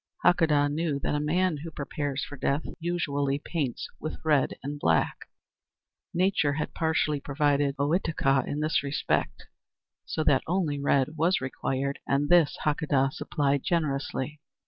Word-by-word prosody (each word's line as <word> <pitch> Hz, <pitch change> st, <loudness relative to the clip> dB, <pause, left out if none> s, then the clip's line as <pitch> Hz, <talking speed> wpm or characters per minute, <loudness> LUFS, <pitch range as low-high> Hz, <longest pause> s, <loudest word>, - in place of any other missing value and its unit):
Hakadah 160 Hz, -5 st, +4 dB
knew 155 Hz, 0 st, -1 dB
that -, -, -1 dB
a 150 Hz, -, +1 dB
man 165 Hz, +3 st, +1 dB
who 160 Hz, +3 st, -7 dB
prepares 145 Hz, -2 st, -3 dB
for 145 Hz, -, -9 dB
death 140 Hz, +2 st, 0 dB, 0.2 s
usually 145 Hz, -5 st, -1 dB
paints 145 Hz, -4 st, -3 dB
with 155 Hz, -, -5 dB
red 150 Hz, -4 st, +2 dB
and 145 Hz, +1 st, -4 dB
black. 80 Hz, -, +1 dB, 0.8 s
Nature 175 Hz, -5 st, +2 dB
had 155 Hz, -, -3 dB
partially 160 Hz, -2 st, +1 dB
provided 145 Hz, 0 st, +1 dB
Ohitika 145 Hz, -3 st, +1 dB
in 150 Hz, -, -2 dB
this 155 Hz, +1 st, +1 dB
respect, 140 Hz, +1 st, -1 dB, 0.6 s
so 155 Hz, -, -2 dB
that 135 Hz, -3 st, +4 dB
only 165 Hz, -5 st, 0 dB
red 140 Hz, +2 st, +1 dB
was 170 Hz, +4 st, +3 dB
required 135 Hz, +1 st, -2 dB
and 140 Hz, +1 st, +1 dB
this 175 Hz, -4 st, +5 dB
Hakadah 145 Hz, -3 st, +2 dB
supplied 140 Hz, -1 st, 0 dB
generously. 150 Hz, -4 st, -1 dB
145 Hz, 140 wpm, -27 LUFS, 140-160 Hz, 0.8 s, this